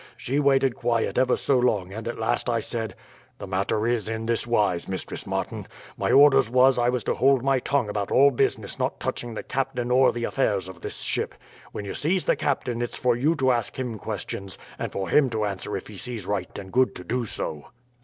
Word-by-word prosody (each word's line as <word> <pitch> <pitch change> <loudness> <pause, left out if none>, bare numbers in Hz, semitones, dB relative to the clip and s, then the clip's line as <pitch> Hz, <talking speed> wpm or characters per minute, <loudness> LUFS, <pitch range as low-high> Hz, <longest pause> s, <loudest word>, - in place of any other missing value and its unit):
She 135 +4 -1
waited 135 -3 +3
quiet 120 0 0
ever 130 -1 +3
so 135 -2 +2
long 100 -7 +1
and 110 +2 -6
at 120 - -4
last 120 +2 0
I 115 -1 +1
said: 115 -1 -4 0.4
"'The - - -7
matter 100 +3 -1
is 115 -2 0
in 115 0 -3
this 115 0 0
wise, 105 -7 +1
Mistress 95 -2 -5
Martin. - - -3 0.3
My - - -1
orders 140 -5 +6
was 130 +1 +5
I 120 0 +3
was 125 -3 -1
to - - 0
hold 135 -2 +3
my 135 -1 +3
tongue 135 -2 0
about 105 -1 -3
all 140 +2 +6
business 120 - -1
not - - -1
touching 120 -2 -4
the - - -5
captain 130 -2 -2
or 130 +1 +5
the 120 - -4
affairs 100 -8 0
of 95 -2 -11
this - - -5
ship. - - -2 0.4
When 105 - -6
you 100 - -4
sees 175 +4 0
the - - +3
captain 125 -4 -1
it's 120 - -3
for 125 -1 +2
you 145 +7 +2
to 130 -4 +2
ask 120 -3 -1
him 120 -4 -4
questions, 95 0 -5 0.2
and - - -3
for 95 -1 -3
him 140 -3 +4
to 110 -2 -1
answer 100 -3 -3
if - - -8
he - - -10
sees 120 -6 -5
right 95 -2 -3
and 95 -1 -9
good 130 0 +3
to 90 - -8
do 120 +6 -2
so.' 75 -7 -4
120 Hz, 225 wpm, -25 LUFS, 105-130 Hz, 0.4 s, orders